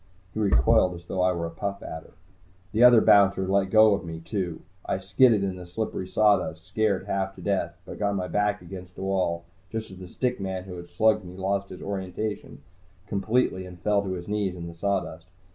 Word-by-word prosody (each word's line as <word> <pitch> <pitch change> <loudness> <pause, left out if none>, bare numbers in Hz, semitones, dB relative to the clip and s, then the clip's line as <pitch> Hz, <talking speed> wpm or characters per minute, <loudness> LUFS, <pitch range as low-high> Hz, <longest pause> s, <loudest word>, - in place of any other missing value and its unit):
He - - -4
recoiled 90 - +3
as 85 0 -11
though 90 - -2
I 90 0 +4
were 85 -2 -2
a 85 - -5
Puff 100 +4 -4
Adder. 80 0 -8 0.6
The 110 +3 +3
other 120 -2 +8
bouncer 100 -2 +5
let 95 0 +2
go 110 0 +6
of 100 - -2
me, 80 -1 -6
too. 90 -1 -4 0.2
I - - -1
skidded 100 +3 +4
in 95 -2 -2
the 90 - -9
slippery 95 0 -4
sawdust, 95 -6 +2
scared 100 0 0
half 95 0 -2
to 95 - -12
death, 85 -3 -1
but - - -9
got 100 -1 0
my 90 -2 -2
back 105 -1 0
against 90 0 -10
a - - -7
wall 90 -3 0 0.3
just 110 -1 -5
as 95 - -11
the 90 - -9
stick 125 +7 -2
man 95 -1 -3
who 95 -1 -8
had 85 0 -10
slugged 105 +3 +2
me 90 0 -10
lost 100 +1 -1
his 90 - -9
orientation 100 +2 -5 0.4
completely 100 -1 0
and 90 -1 -11
fell 105 +3 +2
to 95 -2 -3
his 90 -1 -6
knees 105 -3 -1
in 85 -1 -7
the 85 - -8
sawdust. 85 -2 -2
95 Hz, 210 wpm, -26 LUFS, 90-105 Hz, 0.6 s, other